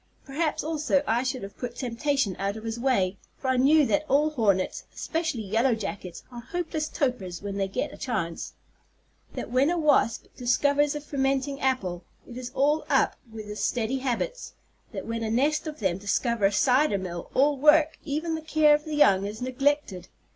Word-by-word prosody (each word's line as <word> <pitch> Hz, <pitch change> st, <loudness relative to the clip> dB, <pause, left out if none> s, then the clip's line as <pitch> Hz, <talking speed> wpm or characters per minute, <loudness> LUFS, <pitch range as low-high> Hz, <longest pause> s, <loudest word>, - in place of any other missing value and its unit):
Perhaps, 300 Hz, +2 st, -1 dB
also, 300 Hz, -2 st, +1 dB
I 230 Hz, 0 st, +1 dB
should 255 Hz, -2 st, -3 dB
have 195 Hz, 0 st, -9 dB
put 245 Hz, -1 st, -5 dB
temptation 250 Hz, -4 st, -1 dB
out 200 Hz, +2 st, -2 dB
of 220 Hz, -, -9 dB
his 225 Hz, +1 st, -4 dB
way; 200 Hz, -7 st, +1 dB, 0.2 s
for 265 Hz, -, -3 dB
I 260 Hz, -, +2 dB
knew 290 Hz, +4 st, +5 dB
that 300 Hz, +3 st, +1 dB
all 300 Hz, +3 st, +3 dB
hornets, 205 Hz, -9 st, +1 dB
especially 320 Hz, -8 st, -2 dB
yellow 225 Hz, +5 st, +2 dB
jackets, 195 Hz, -4 st, -6 dB
are 240 Hz, -1 st, -8 dB
hopeless 315 Hz, +3 st, -3 dB
topers 205 Hz, -, -2 dB
when 200 Hz, -1 st, -4 dB
they 195 Hz, -1 st, 0 dB
get 265 Hz, +9 st, -3 dB
a -, -, -10 dB
chance; 170 Hz, -10 st, -3 dB, 0.8 s
that -, -, -5 dB
when 260 Hz, +4 st, +3 dB
a 350 Hz, -, 0 dB
wasp 295 Hz, -8 st, +3 dB
discovers 285 Hz, +4 st, +2 dB
a 295 Hz, -, -4 dB
fermenting 275 Hz, -1 st, -1 dB
apple, 190 Hz, -10 st, -1 dB, 0.2 s
it 240 Hz, -, -10 dB
is 250 Hz, -1 st, -6 dB
all 295 Hz, +3 st, +2 dB
up -, -, +3 dB, 0.2 s
with 220 Hz, -1 st, -8 dB
his 210 Hz, 0 st, -5 dB
steady 245 Hz, +2 st, 0 dB
habits; 275 Hz, -, -3 dB, 0.4 s
that -, -, -6 dB
when 230 Hz, 0 st, -3 dB
a 220 Hz, -, -2 dB
nest 290 Hz, +8 st, +1 dB
of 305 Hz, -1 st, -5 dB
them 190 Hz, -4 st, -1 dB
discover 210 Hz, +2 st, 0 dB
a -, -, -1 dB
cider 250 Hz, +2 st, +3 dB
mill, 175 Hz, -2 st, -6 dB
all 285 Hz, +2 st, +4 dB
work, 300 Hz, +3 st, +4 dB
even 315 Hz, +3 st, -2 dB
the 320 Hz, -, -3 dB
care 310 Hz, -1 st, +4 dB
of 300 Hz, +1 st, +1 dB
the 310 Hz, -1 st, -4 dB
young, 200 Hz, -9 st, +4 dB
is 210 Hz, +2 st, -7 dB
neglected. 255 Hz, -, -1 dB
255 Hz, 190 wpm, -26 LUFS, 220-295 Hz, 0.8 s, knew